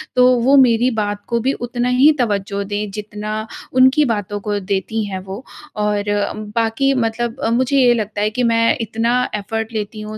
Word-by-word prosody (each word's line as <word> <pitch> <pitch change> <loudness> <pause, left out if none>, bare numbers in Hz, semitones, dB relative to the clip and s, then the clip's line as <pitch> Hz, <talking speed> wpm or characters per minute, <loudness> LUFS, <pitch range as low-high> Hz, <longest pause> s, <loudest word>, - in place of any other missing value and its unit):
तो 250 0 +6
वो 265 +4 +4
मेरी 245 -2 +4
बात 205 0 -3
को 235 -1 0
भी 260 +4 0
उतना 245 +1 -2
ही 260 +5 +5
तवज्जो 200 -3 -1
दें, 205 +1 -4
जितना 215 +1 -5 0.3
उनकी 260 +4 +5
बातों 205 -4 -2
को 205 0 -2
देती 200 +3 -2
हैं 190 -2 -5
वो। 190 +5 -8 0.3
और 210 -1 0 0.5
बाकी 230 +4 +1
मतलब 235 -1 -2
मुझे 260 +3 +1
ये 250 -2 +5
लगता 215 -3 -3
है 210 - +2
कि 250 +3 -2
मैं 230 -1 +2 0.2
इतना 225 +1 -1 0.2
एफ़र्ट 225 +2 -4
लेती 215 0 -4
हूँ 215 0 -7
225 Hz, 175 wpm, -18 LUFS, 205-245 Hz, 0.5 s, तो